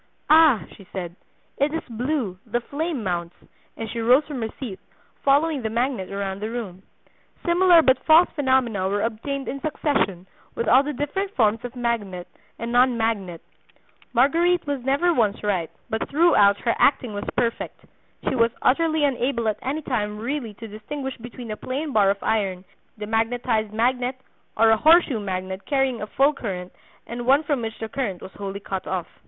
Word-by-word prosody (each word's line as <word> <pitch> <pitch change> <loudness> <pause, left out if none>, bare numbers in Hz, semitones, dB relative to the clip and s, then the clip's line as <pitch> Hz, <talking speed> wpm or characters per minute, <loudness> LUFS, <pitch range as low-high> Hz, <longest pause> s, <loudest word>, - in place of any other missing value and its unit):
'Ah,' 310 -8 +6
she 195 - -15
said, 175 -3 -5 0.4
'it 285 +2 +2
is 325 - -3
blue, 240 -5 -2
the 240 +2 0
flame 285 +1 -3
mounts,' 175 -2 -3 0.4
and 225 - -4
she 235 - -4
rose 250 +6 +4
from 285 -5 -5
her 225 - -2
seat, 225 -8 -6 0.4
following 285 +1 +3
the 220 - -2
magnet 235 -4 -1
around 195 -1 -3
the 215 +2 -3
room. 215 -6 -6 0.6
Similar 345 -1 +5
but 260 -2 +3
false 325 +3 +6
phenomena 260 -9 +1
were 205 +1 0
obtained 265 +5 -3
in 275 - -4
succession 275 - -1 0.3
with 235 - -2
all 255 +3 +7
the 290 +1 -3
different 335 +9 -3
forms 220 -1 +2
of 245 +1 -7
magnet 215 -7 -2 0.3
and 230 +1 -4
non 245 0 +4
magnet; 200 -7 -2 0.7
Marguerite 335 +8 +3
was 285 -3 -2
never 285 +7 +2
once 215 -8 +1
right, 185 -6 0 0.2
but 220 -1 -3
throughout 275 -11 +5
her 235 - +1
acting 250 -5 +3
was 205 - -4
perfect; 235 -2 -2 0.4
she - - +2
was 230 -2 +3
utterly 315 +3 +2
unable 250 -4 0
at 215 - -1
any 295 +4 -3
time 210 -6 -2
really 235 -1 -4
to 225 +2 -9
distinguish 265 +6 -6
between 235 -1 -8
a - - -3
plain 280 +3 -4
bar 205 -2 +4
of 200 0 -1
iron, 195 -4 -1 0.3
demagnetized 225 0 0
magnet 250 +3 0 0.4
or 225 +1 +5
a 220 - +5
horseshoe 315 -4 +5
magnet 190 -1 -4
carrying 270 -4 +1
a 210 - -4
full 275 +6 +3
current 185 -9 -5 0.3
and 240 +1 -6
one 280 +4 +5
from 290 -4 -1
which 225 -1 -5
the 225 - -5
current 220 -7 -3
was - - -10
wholly 200 0 -6
cut 195 -1 -5
off." 185 -2 -2
235 Hz, 175 wpm, -23 LUFS, 210-275 Hz, 0.7 s, all